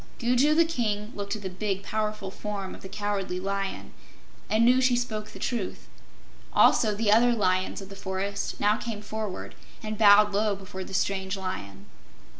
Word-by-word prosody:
Gugu 250 +6 +3
the 335 +1 +5
King 220 -8 -2
looked 200 +1 -3
at 210 - -8
the - - -2
big, 195 +1 -2
powerful 215 -2 -3
form 200 -2 -5
of - - -12
the 190 - -9
Cowardly 200 -3 -2
Lion, 195 +1 -3 0.6
and 220 +2 +4
knew 250 +2 +5
she 255 -1 +4
spoke 220 -3 -2
the - - -11
truth. 235 -7 -3 0.7
Also 215 -3 +5
the 210 0 +1
other 240 +3 +5
Lions 185 -3 0
of 195 - -11
the 195 - -9
forest 195 +1 -3
now 210 +1 +3
came 220 -3 -5
forward 215 -2 -5 0.3
and 215 0 -4
bowed 205 -1 +7
low 210 0 +1
before 190 -1 -7
the 190 - -7
strange 190 0 -1
Lion. 100 - -6
205 Hz, 175 wpm, -27 LUFS, 195-220 Hz, 0.7 s, bowed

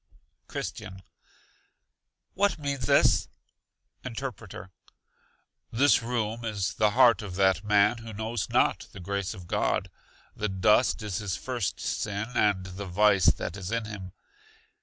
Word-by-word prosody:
Christian. 95 0 -6 1.3
What 200 -1 +1
means 140 -3 -3
this? - - +4 0.8
Interpreter. 115 -6 -7 1.0
This 130 +2 +4
room 115 -1 -2
is 100 -4 -2
the 105 -1 +3
heart 125 -4 +6
of 95 -4 -7
that 95 -2 +2
man 105 +2 +3
who 115 0 -9
knows 110 +1 -3
not - - +1
the - - -9
grace 100 +1 -3
of 90 - -11
God. - - -1 0.4
The 105 - -2
dust 105 +5 +3
is 105 -4 -3
his 100 -4 -3
first 120 -7 -3
sin 105 +3 -3
and 100 -5 +2
the 95 +1 -7
vice 100 -1 +3
that 80 +2 +1
is 95 -2 -6
in 115 -1 -1
him. 100 -4 -8
105 Hz, 135 wpm, -27 LUFS, 95-115 Hz, 1.3 s, heart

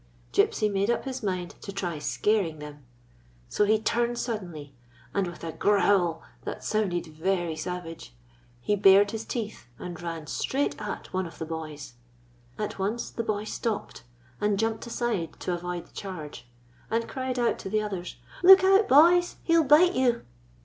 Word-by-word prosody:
Gypsy 215 - +3
made 200 +1 0
up 235 - 0
his 260 -1 -4
mind 185 -4 -3
to 200 - -6
try 180 -5 -3
scaring 190 +1 0
them. 150 -1 -10 0.7
So 210 - +2
he 215 +2 +4 0.4
suddenly 185 - -4
turned, - - -20 0.4
and, 195 -2 0
with 175 -1 -9
a 165 - -3
growl 195 -4 +2 0.2
that - - -6
sounded 200 -5 0
very 170 +1 -1
savage, 165 - -6 0.5
he 205 - +1
bared 200 0 +6
his 225 0 -5
teeth 215 - -5
and 175 -1 -7
ran 165 -2 -5
straight 275 - -1
at - - -6
one 185 -1 -1
of 165 - -13
the 160 - -4
boys. 155 -4 -7 0.6
At 210 -2 -4
once 210 +5 -2
the - - -3
boy 210 -2 -1
stopped, 220 0 -4 0.4
and 210 -1 +1
jumped 225 +2 -1
aside 230 -9 -2
to 180 - -1
avoid 175 0 -4
the - - -25
charge, 155 -10 -7 0.4
and 230 +1 0
cried 260 -1 -3
out 240 -1 +1
to - - -6
the 215 +1 +1
others: 190 -4 -5 0.3
"Look 380 +1 +9
out, 390 +2 +5
boys, 345 +5 +6
he 335 - +2
'll 330 - +5
bite 320 +6 +6
you!" 245 -2 +1
200 Hz, 170 wpm, -27 LUFS, 175-230 Hz, 0.7 s, Look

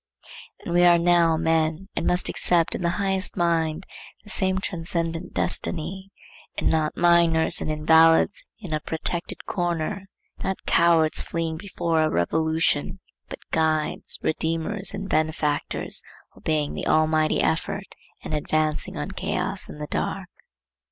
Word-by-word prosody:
And 170 - -3
we 175 0 +4
are 175 -1 +7
now 170 -1 +3
men, 160 +2 0
and 165 - -1
must 180 0 +1
accept 170 -2 +2
in - - -4
the 170 - +1
highest 190 -2 -1
mind 165 0 0 0.4
the 210 - -9
same 190 -2 +1
transcendent 170 -2 -3
destiny; 190 +3 -3 0.5
and - - +1
not 155 -1 0
minors 170 -2 +3
and - - -3
invalids 160 +4 +4 0.2
in 185 -7 -6
a 155 - 0
protected 165 +3 -3
corner, 175 +2 -2 0.4
not 190 0 -3
cowards 165 -2 +4
fleeing 165 -1 -3
before 165 -3 -1
a 155 - +2
revolution, 160 - 0 0.3
but - - -10
guides, 155 -1 0
redeemers 165 +6 0
and 195 0 -5
benefactors, 155 -3 0 0.3
obeying 155 -2 -1
the - - -4
Almighty 155 0 +2
effort 165 +5 -1 0.3
and - - -5
advancing 155 0 -1
on - - -4
Chaos - - -3
and - - -9
the 150 - -4
Dark. - - -3
165 Hz, 135 wpm, -24 LUFS, 155-175 Hz, 0.5 s, are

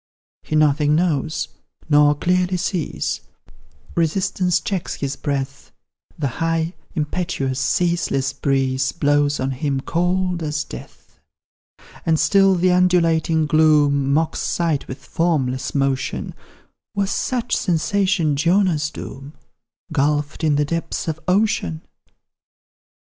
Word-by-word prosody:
He 155 - -4
nothing 150 0 +3
knows 160 -2 0 0.4
nor 145 -1 +5
clearly 180 +3 +1
sees, 165 - -2 0.7
Resistance 180 +2 +1
checks 190 -2 -3
his 140 -1 -3
breath, 140 -1 -4 0.5
The 145 - -1
high, 165 +1 0 0.2
impetuous, 150 -4 -2
ceaseless 135 -4 0
breeze 135 -1 0
Blows 145 -2 +2
on 130 +1 -1
him 135 +1 -1
cold 180 +2 0
as 150 -1 -2
death. - - -12 0.8
And 160 -1 +2
still 195 +4 +4
the 180 +1 +2
undulating 165 -3 +3
gloom 150 -3 +3
Mocks 155 +3 +1
sight 165 -5 -1
with 130 - -9
formless 140 -7 -1
motion: 135 -1 -1 0.6
Was 200 -1 0
such 245 -1 -1
sensation 180 -2 +1
Jonah's 170 -1 +2
doom, 135 0 -9 0.6
Gulphed 145 +1 0
in 155 -2 +3
the 150 0 +2
depths 165 +3 -3
of 160 -1 -2
ocean? 180 - +1
155 Hz, 110 wpm, -21 LUFS, 140-175 Hz, 0.8 s, nor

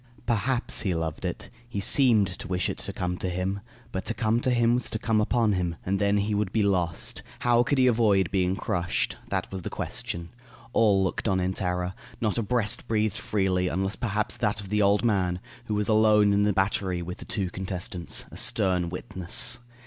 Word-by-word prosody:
Perhaps 120 +2 +1
he 95 -5 0
loved 80 -2 -3
it. - - -5 0.2
He 100 - -3
seemed 115 0 +5
to - - -7
wish 90 0 -1
it - - -7
to - - -4
come 90 0 -3
to 95 - -1
him. 90 +2 -2 0.3
But 95 - -3
to 115 - -3
come 115 0 +1
to 130 - +2
him 120 -1 +3
was 125 -1 -1
to - - -2
come 110 0 +1
upon 115 0 +2
him. 90 -3 -1
And 95 +1 0
then 100 +1 +2
he 105 +1 0
would 100 -2 0
be 110 0 +1
lost. 90 -4 0 0.2
How 120 -1 +4
could 135 +3 +1
he 130 - +5
avoid 105 -7 +3
being 95 -1 +1
crushed? 85 -2 -1
That - - -2
was 95 -1 -5
the - - -5
question. 85 0 -4 0.4
All 100 -4 +4
looked 95 - -2
on 95 -3 +2
in 90 +1 0
terror. 90 0 -2 0.3
Not 110 0 0
a - - +1
breast 110 -1 0
breathed 110 -2 0
freely, 95 -3 0
unless 95 +2 -1
perhaps 105 0 -1
that 105 -3 0
of 100 -2 -7
the 105 +1 +1
old 100 +3 +3
man, 90 -5 +1 0.3
who 105 - -2
was 105 0 0
alone 105 -2 +4
in 100 +1 +3
the 105 - +3
battery 95 -2 0
with 90 +1 -7
the - - -9
two 100 -5 -2
contestants, 90 -2 -3
a - - -8
stern 90 -2 +2
witness. 95 +7 0
100 Hz, 210 wpm, -26 LUFS, 90-110 Hz, 0.4 s, seemed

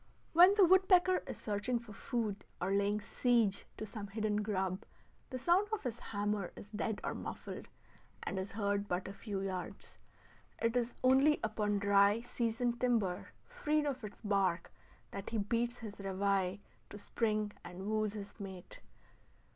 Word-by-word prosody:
When 360 +4 +8
the 400 -3 +7
woodpecker 370 0 +5
is - - -5
searching 215 +4 -1
for 230 -3 -9
food, 215 -3 -2 0.2
or 180 +2 -1
laying 200 +1 +2
siege 220 -1 +1
to 215 - -4
some 210 -1 -7
hidden 210 +1 -1
grub, 195 -2 -1 0.5
the 255 - -4
sound 345 +10 +3
of 435 - -2
his 240 -2 -3
hammer 205 -4 -2
is 205 - -11
dead 215 -1 -2
or - - -1
muffled, - - -6 0.6
and 190 - -2
is 190 +1 -5
heard 200 -1 0
but 180 0 -1
a 195 - -6
few 200 -1 -4
yards. 185 -2 -5 0.6
It 230 +1 +1
is 245 -1 0
only 270 +4 +5
upon 210 -1 0
dry, 200 +2 +4
seasoned 235 0 -1
timber, 225 -8 +1 0.2
freed 305 -12 0
of 265 -4 -2
its 210 -1 -8
bark, 195 -4 +1 0.4
that 195 - -5
he 230 - -1
beats 235 +3 0
his 215 -3 -8
reveille 195 -1 0 0.3
to - - -8
spring 215 0 -1
and 180 +2 -8
wooes 215 0 0
his 205 +1 -8
mate. 190 -3 -8
210 Hz, 160 wpm, -34 LUFS, 200-240 Hz, 0.6 s, When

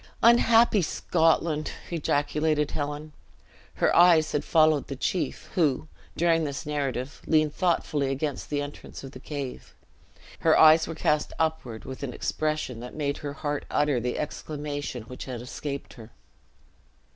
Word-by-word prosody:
"Unhappy 235 -2 +6
Scotland!" 160 -1 +1 0.2
ejaculated 150 -1 0
Helen. 150 +1 -4 0.6
Her - - +2
eyes 170 -3 +6
had 150 - 0
followed 155 -3 +3
the 135 - -5
chief, 170 +6 -3
who, 155 -4 +1 0.3
during 165 -1 +3
this 140 -4 -4
narrative, 140 -2 -3
leaned 155 -2 +3
thoughtfully 155 -5 0
against 140 +1 -3
the 145 -1 -1
entrance 145 -1 -9
of 135 - -8
the 130 - -10
cave. 140 -2 -7 0.6
His - - +4
eyes 160 +1 +7
were 165 - -5
cast 150 -1 0
upward 155 -8 -2
with 130 - -7
an 135 -3 -4
expression 155 -6 -2
that 125 +1 -9
made 140 -2 -1
her 145 -1 -5
heart 145 0 -3
utter 145 -4 +1
the 125 +1 -2
exclamation 145 -4 -4
which 125 +3 -9
had 125 -3 -5
escaped 140 +3 -6
her. 115 -3 -12
150 Hz, 145 wpm, -27 LUFS, 140-155 Hz, 0.6 s, eyes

